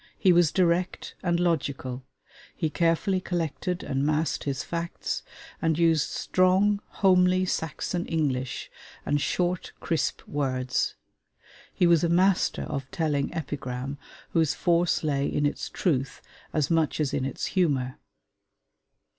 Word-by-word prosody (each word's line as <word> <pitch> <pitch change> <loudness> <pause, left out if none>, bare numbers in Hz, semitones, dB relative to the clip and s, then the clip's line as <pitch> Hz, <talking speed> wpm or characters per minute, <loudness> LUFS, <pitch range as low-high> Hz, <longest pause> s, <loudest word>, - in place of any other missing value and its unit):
He 185 - +5
was 170 -2 +4
direct 180 0 +1
and 170 -1 +1
logical; 140 -7 -1 0.5
he 160 -3 -1
carefully 175 +4 +1
collected 175 +1 -2
and 135 +1 -1
massed 155 +2 0
his 135 -3 -2
facts, 170 0 -3 0.4
and 160 -1 +1
used 165 -3 +3
strong, 190 +3 +2 0.2
homely 185 -1 +5
Saxon 175 +1 -2
English, 135 -6 -2 0.3
and 145 0 +1
short 180 +2 -1
crisp 165 - -1
words; 130 -3 -1 0.8
he 180 - +2
was 170 -2 +5
a 170 - +2
master 185 +2 +3
of 135 -2 -4
telling 155 -6 0
epigram 135 -2 -4 0.3
whose 160 -3 +2
force 170 0 +2
lay 140 -2 +1
in 145 - 0
its 145 - -2
truth 135 -6 -1 0.3
as 155 0 0
much 160 -2 +2
as 150 -3 0
in - - 0
its 135 -1 -3
humor. 140 -9 +1
160 Hz, 130 wpm, -27 LUFS, 140-175 Hz, 0.8 s, He